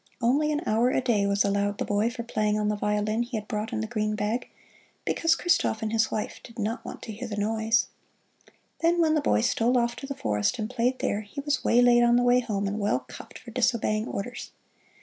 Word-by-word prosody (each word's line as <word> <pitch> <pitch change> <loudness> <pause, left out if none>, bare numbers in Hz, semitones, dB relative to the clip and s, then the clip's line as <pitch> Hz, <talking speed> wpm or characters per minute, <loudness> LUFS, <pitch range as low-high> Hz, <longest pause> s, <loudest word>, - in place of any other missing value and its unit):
Only 280 +6 +2
an 300 +2 -1
hour 230 +3 +2
a - - +1
day 230 -6 +1
was 200 +1 +2
allowed 200 0 0
the - - -2
boy 205 +2 +1
for 235 0 -6
playing 215 -2 0
on 210 0 0
the 210 - 0
violin 210 +2 0
he 240 -1 -3
had 210 -1 -6
brought 215 +1 -3
in 215 - -2
the 220 - -3
green 215 -2 -1
bag, 215 +4 -2 0.6
because 330 0 +2
Christoph 330 -11 +1
and 220 0 -2
his 225 0 +2
wife 215 - -4
"did 230 - -13
not 225 +2 -2
want - - -8
to 225 - -6
hear 230 +4 -6
the 210 -2 -5
noise." 220 +2 +1 0.9
Then 340 +1 +2
when 320 -2 +3
the 305 - +2
boy 280 - +2
stole 240 +1 +2
off 235 0 +1
to 275 - -7
the 275 - -4
forest 105 - 0
and 215 +1 -4
played 250 +1 0
there, 210 - -1
he 205 +6 -9
was 285 -2 -1
waylaid 240 0 +5
on 240 0 +4
the 245 - +3
way 245 0 +5
home 210 -5 -2
and 205 +2 -3
well 200 -11 +1
cuffed - - -10
for 235 - -12
disobeying 230 -2 +1
orders. 240 +5 -5
225 Hz, 230 wpm, -27 LUFS, 210-245 Hz, 0.9 s, waylaid